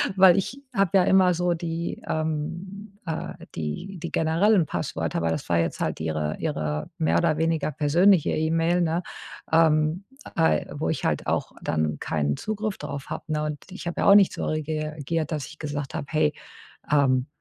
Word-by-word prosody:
Weil 190 -1 +7
ich 255 +8 -2
habe 195 -3 +3
ja 185 - +5
immer 185 -1 +5
so 175 0 +1
die 170 0 -4
ähm, 170 +6 -4
äh, 160 -3 -4 0.2
die 85 - -5
die 170 - -5
generellen 170 +4 +3
Passwörter, 85 - -2
weil 80 -1 +1
das - - -3
war 85 -1 +3
jetzt 85 - -1
halt - - -1
ihre 80 -1 -2
ihre 75 -1 -2
mehr 80 +2 +2
oder 155 - +2
weniger 160 -2 0
persönliche 165 +5 +4
E-Mail, 165 +3 +1
ne, 170 +1 0 0.5
ähm, 160 +2 +3 0.3
äh, 80 -2 +2
wo - - -2
ich - - -2
halt - - 0
auch - - -1
dann 80 -1 -1
keinen 70 -2 -1
Zugriff 215 -1 -3
drauf 140 -2 -5
habe, - - -5
ne? 150 0 0
Und 150 -1 -3
ich 190 - -8
habe 170 - -2
ja - - +2
auch 200 - +9
nicht 200 -2 +6
so - - -3
rea 155 0 -1 0.3
reagiert, 155 +1 -3
dass 150 -3 -2
ich 160 - -13
gesagt 145 -1 -4
habe: 150 -4 -4
„Hey, 155 -1 +2 0.6
ähm, 135 -3 +3
160 Hz, 185 wpm, -25 LUFS, 140-175 Hz, 0.6 s, auch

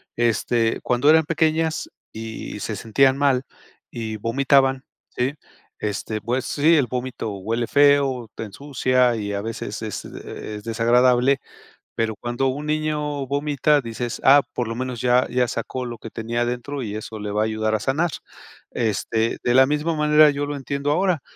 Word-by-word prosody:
este, 115 0 +1
cuando 125 +5 +3
eran 160 0 +5
pequeñas, 160 0 0 0.2
y 110 -1 -7
se 110 - -3
sentían 130 +6 +2
mal 135 -2 +2 0.5
y 110 -2 -4
vomitaban, 135 +3 +2 0.2
¿sí? 130 +3 -2 0.4
Este, 105 +1 -3
pues 125 +2 -1
sí, 155 +4 +3
el 140 -6 +2
vómito 125 -3 -4
huele 115 +5 -2
feo, 140 -4 +3
te 115 - -5
ensucia 125 +1 +1
y 100 -1 -3
a 100 - -2
veces 110 -1 -5
es, 110 -2 -5
eh, 105 - -8
es 105 - -11
desagradable", 125 +3 +3 0.6
pero 110 -1 -1
cuando 120 +4 -2
un 145 +3 -3
niño 150 -2 -1
vomita 145 +1 +1
dices: 115 0 -5
"Ah, 140 +2 +7
por 120 -2 -2
lo 115 - -3
menos 125 -1 -4
ya 125 0 +3
ya 125 0 +1
sacó 125 +2 -4
lo 120 -1 -6
que 115 - -8
tenía 115 +2 -3
adentro, 125 +3 -3
y 105 -2 -5
eso 110 0 -7
le 105 0 -4
va 105 - 0
a - - +1
ayudar 110 0 0
a 110 - 0
sanar". 155 +7 0 0.6
Este, 110 +1 -1
de 120 - +2
la 130 - +7
misma 150 +3 0
manera 150 0 +5
yo 145 0 -2
lo 145 0 -4
entiendo 140 +1 -2
ahora, 180 -1 +1
125 Hz, 170 wpm, -22 LUFS, 115-145 Hz, 0.6 s, Ah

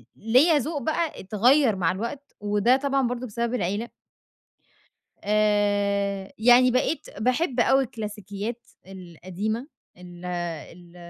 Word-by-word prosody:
ليَّ 260 +9 +4
ذوق 290 +1 -3
بَقى 315 +2 -2
اتغيَّر 230 +5 +3
مع 180 -3 +1
الوقت، 235 +9 -6
وده 205 +4 +2
طبعًا 275 -2 0
برضه 245 +1 -4
بسبب 235 +2 -3
العيلة. 210 +2 -2 1.3
آآ، 205 -1 +1
يعني 245 +2 +6
بقيت 255 +5 -1
باحب 255 +3 0
أوي 265 +3 +4
الكلاسيكيات 215 0 -6 0.2
القديمة، 190 - -5 0.3
ال 180 0 -12
ال 175 0 -6
215 Hz, 110 wpm, -25 LUFS, 195-255 Hz, 1.3 s, يعني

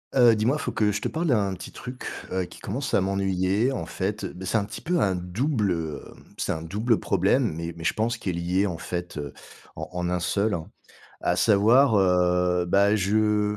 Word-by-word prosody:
Heu, 120 -3 +6
dis-moi, 120 +7 +1
faut - - -3
que 105 -1 +1
je 105 +1 -3
te - - -1
parle 165 +2 -2
d'un 105 -8 +2
petit 95 - -8
truc, 125 0 -8 0.3
heu, 95 -1 -1
qui - - -13
commence 135 +9 -4
à - - +4
m'ennuyer. 95 +4 +1
En 135 - -3
fait, 100 +2 -3
bah, 95 0 -7
c'est 115 - +2
un 100 - 0
petit - - -8
peu 175 +1 0
un 95 - +2
double, 105 - -1
heu, 80 -4 -3 0.4
c'est - - -1
un 80 - -3
double 105 +7 0
problème, 100 - +1
mais 85 +1 -5
mais 80 - -8
je - - +1
pense 115 +2 -1
qui 105 - -4
est - - -1
lié 90 +3 0
en 90 -5 -3
fait, 90 +1 -5
heu, 70 -2 -5 0.4
en - - -6
en 90 -1 -2
un 90 0 0
seul, 100 +4 0
hein. 80 -2 -7 0.5
À 90 - +1
savoir, 110 +7 +5
heu, 90 -1 +2
bah, 100 +4 +4
je 105 +1 +1
100 Hz, 215 wpm, -25 LUFS, 90-110 Hz, 0.5 s, Heu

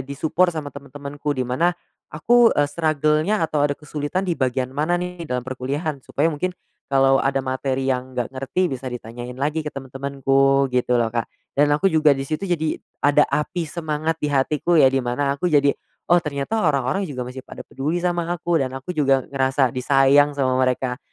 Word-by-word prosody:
di-support 160 +6 +1
sama 155 -4 -4
teman-temanku. 140 +1 -5
Di 130 - 0
mana 170 +9 +1 0.3
aku, 235 +10 +4
eee, 145 - +4
struggle-nya 155 +4 +1
atau 155 -2 -1
ada 145 -1 +1
kesulitan 150 +5 -3
di 180 - 0
bagian 130 -2 -1
mana 155 +5 0
nih 180 -2 -5
dalam 125 -1 -2
perkuliahan, 135 +4 -3
supaya 155 +5 0
mungkin 180 +4 -3 0.3
kalau 135 0 +4
ada 135 0 +1
materi 130 0 -2
yang 130 -1 -2
nggak 125 +2 -2
ngerti 135 +8 0
bisa 130 -4 -5
ditanyain 120 +1 -7
lagi 150 +3 -1
ke 150 - -5
temen-temenku 135 0 +1
gitu 125 -1 +2
loh, 115 - +2
Kak. 115 -1 -2 0.3
Dan 145 +1 +3
aku 150 +7 +2
juga 155 -4 +4
di 135 - -3
situ 155 +5 -3
jadi 160 -3 -1 0.2
ada 145 +1 +4
api 165 +3 -1
semangat 160 0 -2
di - - -2
hatiku 145 +4 +1
ya, 150 -5 +7
di 135 - +1
mana 130 +3 -1
aku 180 - -1
jadi, 145 -4 +4 0.4
"Oh, 175 - +7
ternyata 150 +6 -2
orang-orang 145 +7 +1
juga 130 -4 -5
masih 130 +1 -9
pada - - -9
peduli 155 +6 -3
sama 175 -1 0
aku." 175 -1 0
Dan 130 -1 -2
aku 135 +6 -7
juga 135 -6 +2
ngerasa 135 -1 +1
disayang 140 +3 +3
sama 130 -2 +1
mereka. 130 0 0
145 Hz, 185 wpm, -22 LUFS, 130-160 Hz, 0.4 s, ya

